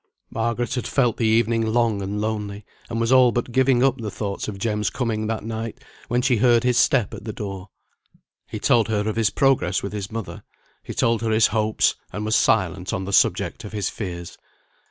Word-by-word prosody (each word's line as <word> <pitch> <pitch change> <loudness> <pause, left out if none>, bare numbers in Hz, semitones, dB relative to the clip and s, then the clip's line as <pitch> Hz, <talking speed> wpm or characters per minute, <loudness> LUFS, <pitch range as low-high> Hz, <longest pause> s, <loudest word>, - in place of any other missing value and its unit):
Margaret 115 +1 -1
had 125 - -2
felt 120 -5 +1
the 115 - +1
evening 115 +1 +2
long 110 -2 +1
and 100 +2 -3
lonely; 105 -1 -3 0.2
and 115 -1 -3
was 115 +1 0
all 130 -2 +6
but 120 +1 -2
giving 130 0 +3
up 135 -1 +2
the 110 -2 -4
thoughts 100 -1 -4
of 105 -2 -5
Jem's 105 -1 -1
coming 110 -4 -2
that 110 0 -3
night, 115 0 -5 0.2
when 125 +1 0
she 125 -2 +3
heard 120 0 +4
his 125 -1 +2
step 125 -8 +2
at - - -8
the 110 - -4
door. 100 -2 -7 0.8
He - - -6
told 115 -3 +3
her 105 -1 -1
of 110 - -1
his 110 -2 +2
progress 130 -7 +1
with 100 - -5
his 100 -1 -5
mother; 115 -3 -6 0.4
he - - -8
told 115 -1 +1
her 115 - -1
his 110 0 +4
hopes, 110 -1 +2 0.2
and 105 +3 -4
was 110 +1 +1
silent 95 -3 +1
on 95 - -2
the 100 - -5
subject - - +2
of 105 - -9
his 105 -3 -1
fears. 85 -5 -7
110 Hz, 210 wpm, -23 LUFS, 105-120 Hz, 0.8 s, all